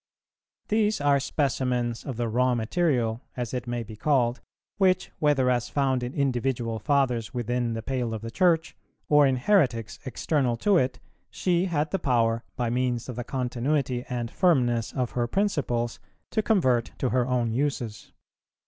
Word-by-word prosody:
These 215 -1 +2
are 145 -1 +3
specimens 125 -4 -1
of 130 -5 -5
the 120 -1 -1
raw 125 +2 +2
material, 120 -2 0 0.2
as 120 -1 -3
it 125 -1 -3
may 120 -1 -2
be 110 -1 -10
called, 125 0 +1 0.4
which, 185 -1 +2
whether 145 -4 +3
as 120 -1 0
found 135 -3 +1
in 125 +2 -5
individual 125 -4 -1
Fathers 125 -5 0
within 120 0 -1
the 115 -1 -4
pale 125 -3 -2
of 110 - -7
the 115 - -5
Church, 170 +3 +2 0.3
or 145 -1 +6
in 130 - +2
heretics 125 - +1
external 130 -1 0
to 200 - +2
it, 125 -4 0 0.3
she 180 - +1
had 155 -4 -1
the 195 - 0
power, 115 -3 +1
by 120 -2 -1
means 125 0 -1
of 125 - -5
the 120 - -4
continuity 125 +1 -1
and 120 -2 -3
firmness 125 - +2
of 125 -3 -2
her 120 -1 -1
principles, 130 - -1 0.3
to 220 - +1
convert 130 - +1
to 130 - 0
her 125 0 +1
own 125 -3 0
uses. 125 -4 -2
125 Hz, 165 wpm, -26 LUFS, 120-145 Hz, 0.4 s, or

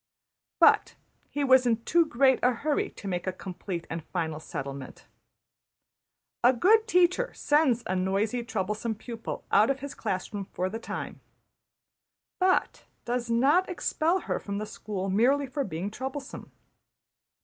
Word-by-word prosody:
'' - - -64
But - - +5 0.3
he 290 - -2
was 260 -2 +5
in 230 -1 +1
too 335 +4 +3
great 265 -1 +3
a 250 +1 +3
hurry 290 +5 -1
to 200 - -10
make 180 -1 -3
a - - +1
complete 185 -1 -6
and 165 -1 -5
final 160 -2 -3
settlement. 140 -3 -7 1.4
A 245 +2 +6
good 435 - +4
teacher 365 +5 +3
sends 290 -6 +2
a 185 - -1
noisy, 195 +6 0
troublesome 220 0 -2
pupil 230 +1 -7
out 210 +3 +5
of 270 -1 -1
his 280 0 -6
class 190 -3 -3
room 200 -1 -4
for 185 +1 -2
the 225 - -4
time, - - -6 1.2
but 370 0 +1 0.2
does 240 0 -2
not 280 +11 +3
expel 355 0 0
her - - -2
from 200 -1 -5
the 210 - -3
school 205 -2 -5
merely 250 +9 +3
for 280 +2 -3
being 190 -1 -4
troublesome. 265 +4 -6
235 Hz, 150 wpm, -28 LUFS, 195-280 Hz, 1.4 s, A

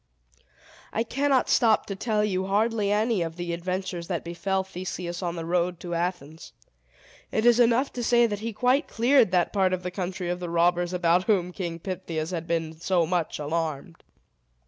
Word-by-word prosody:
I 225 - 0
cannot 275 +2 +1
stop 225 -3 +3
to 195 - -5
tell 210 +1 0
you 190 -2 -1
hardly 210 +1 +1
any 215 -1 +1
of 165 -1 -3
the 175 -1 -4
adventures 180 0 -3
that 175 -3 -2
befell 190 +3 -1
Theseus 180 -1 -5
on 175 -2 -2
the 165 -1 -5
road 175 0 0
to 175 -1 -5
Athens. 170 -3 -4 0.8
It 220 - 0
is 240 0 +6
enough 245 +3 +3
to 245 - -4
say, 240 +1 +4
that 205 -3 -2
he 230 +2 -4
quite 250 +7 +2
cleared 245 -1 +4
that 180 -1 +1
part 190 -2 +2
of 185 0 -2
the 180 - -3
country 185 -1 -4
of 180 - -3
the 175 -1 -5
robbers 175 +1 +2
about 180 0 +2
whom 185 -5 +1
King 175 -3 -4
Pittheus 165 -2 -4
had 170 -2 -4
been 160 -2 -2
so 175 -1 +1
much 170 -1 -1
alarmed. 155 +1 -3
180 Hz, 185 wpm, -26 LUFS, 170-215 Hz, 0.8 s, is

